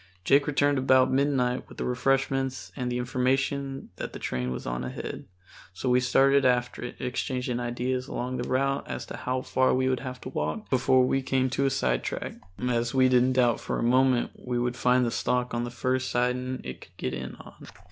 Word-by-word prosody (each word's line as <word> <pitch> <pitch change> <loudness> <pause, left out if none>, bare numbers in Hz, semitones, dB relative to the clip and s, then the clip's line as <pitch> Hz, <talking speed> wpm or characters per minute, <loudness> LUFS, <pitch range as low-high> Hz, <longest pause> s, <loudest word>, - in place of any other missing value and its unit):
Jake 140 +1 +4
returned 145 -1 +2
about 130 0 +4
midnight 130 -2 +1
with - - -13
the - - -3
refreshments 130 -4 0
and 125 -1 -2
the 120 - -1
information 135 +2 -1
that - - -5
the - - -5
train 65 0 -2
was 65 - -5
on - - -3
ahead. 65 - -6 0.5
So 125 - -2
we 125 0 +5
started 135 +2 +4
after 125 -1 +1
it, 125 - -6
exchanging 125 -1 -2
ideas 125 +2 -2
along 125 0 -3
the 120 - -4
route 135 +2 0
as - - -5
to - - -7
how 130 0 -2
far 130 0 +2
we 130 0 +1
would 130 -1 +1
have 130 -1 -6
to - - -6
walk 75 -10 -3
before 130 0 +4
we 135 +1 +1
came 130 -1 0
to 135 +1 +1
a - - +3
sidetrack, 65 - -2 0.3
as 120 0 0
we 130 -1 +5
didn't 125 0 +4
doubt 125 -2 +3
for - - -3
a - - -1
moment 125 +1 +3
we 125 -1 -2
would 120 0 0
find 125 0 +3
the 115 - -1
stock 125 +1 0
on 120 0 -1
the - - -4
first 130 +2 -1
siding 125 +1 -1
it 65 0 -7
could - - -16
get 65 - -3
in 65 0 -5
on. - - -14
125 Hz, 210 wpm, -27 LUFS, 120-130 Hz, 0.5 s, we